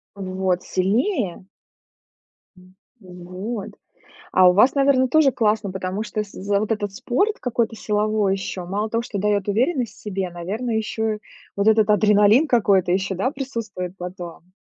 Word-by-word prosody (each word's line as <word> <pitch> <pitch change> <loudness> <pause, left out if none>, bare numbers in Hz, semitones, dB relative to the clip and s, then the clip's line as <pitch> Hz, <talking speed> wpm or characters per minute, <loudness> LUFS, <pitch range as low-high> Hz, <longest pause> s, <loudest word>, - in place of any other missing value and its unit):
Вот 185 -2 -2
сильнее. 200 - -1 1.1
М, 185 +1 -19 0.2
вот. 185 +3 -7 0.6
А 185 -1 +6
у - - +5
вас 215 +10 +4
наверно 275 -2 +3
тоже 285 0 +4
классно. 215 -3 0
Потому 190 +2 -3
что, 215 -1 -3
с 205 - -12
за 200 +1 -1
вот 215 +1 -1
этот 205 -2 -3
спорт 275 - 0
какой-то 230 -2 -1
силовой 210 -1 0
ещё 190 -2 -5
мало 205 +4 -2
того, 230 +1 0
что 215 -4 -5
даёт 205 0 0
уверенность 245 - 0
в - - -18
себе, 195 -3 -3
наверное, 210 +8 -3
ещё 220 0 -2 0.4
вот 200 +2 +2
этот 220 -1 +4
адреналин 210 +5 +5
какой-то 200 -8 +3
ещё 190 +1 0
да 195 +8 0
присутствует 230 -10 -5
потом? 180 -1 -9
210 Hz, 150 wpm, -22 LUFS, 185-230 Hz, 1.1 s, А